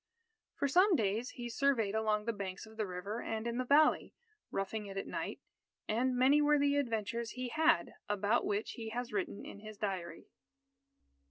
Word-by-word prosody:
For 280 - 0
some 365 +7 +5
days, 220 +1 0
he 240 -2 -6
surveyed 235 -4 +1
along 215 -1 +1
the 230 - 0
banks 195 -1 -5
of 220 0 -14
the 215 -2 -2
river 190 +5 -4
and 220 0 -3
in 235 +1 -2
the - - +1
valley, 295 +4 +4 0.3
roughing 205 +2 -3
it 195 0 -7
at 195 - -2
night. - - -4 0.5
And 250 +4 +1
many 270 +4 +5
were 295 0 +4
the 285 0 +3
adventures 230 -3 -1
he 250 0 -4
had 320 +4 +2 0.2
about 205 +3 +2
which 205 +2 -1
he 225 -1 -6
has 240 0 -4
written 200 0 -3
in - - -9
his 215 0 -10
diary. 180 -5 -4
225 Hz, 180 wpm, -34 LUFS, 205-255 Hz, 0.5 s, some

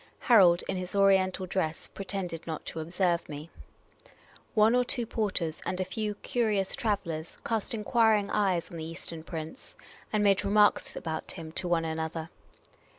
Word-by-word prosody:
Harold, 185 -7 +6
in 190 - -2
his 185 +1 -4
Oriental 190 -1 +3
dress, 175 -4 -2
pretended 185 -4 -5
not 160 -1 -5
to 165 - -5
observe 175 +1 0
me. 150 +2 -7 1.0
One 220 +1 +5
or 250 0 +4
two 240 -1 0
porters, 195 -8 -2
and 180 - -3
a 185 - 0
few 210 +2 -3
curious 210 -5 0
travel 210 -9 -1
lers, 160 +1 -6
cast 225 +2 -1
enquiring 215 -2 +2
eyes 185 -5 +1
on 170 - -7
the 160 - -5
Eastern 165 0 -7
prince, 160 +7 -7 0.4
and 215 -1 +2
made 200 -1 +4
re 200 - -1
marks 210 0 +4
about 160 -1 -4
him 165 -3 -8
to 180 - -3
one 170 -2 +1
another. 160 0 -3
185 Hz, 165 wpm, -29 LUFS, 165-210 Hz, 1.0 s, Harold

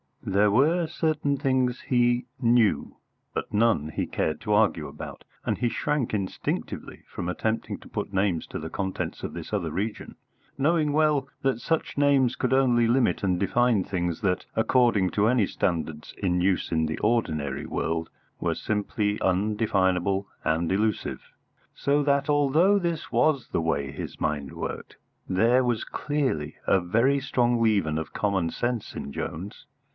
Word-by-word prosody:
There 100 +2 +3
were 160 - +3
certain 155 -3 0
things 130 -2 +1
he 120 -1 +2
knew, 115 -8 +2 0.4
but - - -4
none 105 -8 +2
he 80 - -2
cared 80 - -2
to 105 - 0
argue 105 -8 +2
about; 70 - -9 0.2
and - - 0
he 120 - +1
shrank 145 -1 -1
instinctively 100 -3 -3
from 85 - -5
attempting 110 +5 -2
to - - -15
put - - -4
names 95 -3 +1
to - - -5
the 80 - -6
contents 95 +1 -4
of - - -4
this - - -7
other - - -1
region, 105 +4 -4 0.4
knowing 150 +1 +2
well 150 -3 +2
that 135 -3 +1
such 160 +4 -2
names 135 -3 +3
could 130 0 0
only 120 -3 +4
limit 120 -2 +2
and 90 -2 +1
define 110 +1 +2
things 85 -3 -2
that, 90 -3 0
according 110 -4 +3
to 105 +4 +2
any 120 -3 +3
standards 80 -5 -2
in 90 -3 0
use 90 0 +1
in 80 -1 +2
the 80 0 -3
ordinary 80 - 0
world, 80 0 -2 0.3
were - - 0
simply 105 0 -1
undefinable 95 -1 +1 0.2
and 80 +2 0
illusive. 105 +2 -1 0.4
So 145 +1 +1
that, 140 +1 +1
although 150 +8 +4
this 170 -4 -3
was 140 -6 +2
the - - 0
way 70 -4 -1
his - - -7
mind 75 -3 -2
worked, - - -6 0.3
there 115 +7 +3
was 120 -2 0
clearly 130 - -2
a 95 - +5
very 115 +10 +2
strong 120 -3 +1
leaven 100 -9 +2
of 80 -1 -5
common 95 -5 0
sense 120 -3 -3
in 70 - -5
Jones. 90 +8 -6
110 Hz, 155 wpm, -26 LUFS, 90-130 Hz, 0.4 s, a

